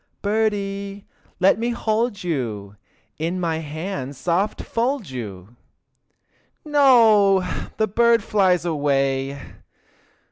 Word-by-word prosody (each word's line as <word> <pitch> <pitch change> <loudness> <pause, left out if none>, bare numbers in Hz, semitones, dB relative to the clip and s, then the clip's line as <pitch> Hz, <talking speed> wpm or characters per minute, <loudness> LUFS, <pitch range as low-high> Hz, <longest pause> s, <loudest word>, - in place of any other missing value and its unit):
Birdie, 200 -2 -2 0.3
let 195 +3 +4
me 235 +1 -1
hold 225 -2 -1
you, 110 - -3 0.4
In 170 +4 -2
my 165 -2 -1
hands 150 -3 -5
soft 180 +7 -1
fold 235 - -2
you! 105 -3 -8 1.1
No! 225 -10 +5 0.3
the 220 - +2
birdie 235 +3 +3
flies 185 -5 +2
away! 140 -3 0
190 Hz, 95 wpm, -22 LUFS, 145-215 Hz, 1.1 s, No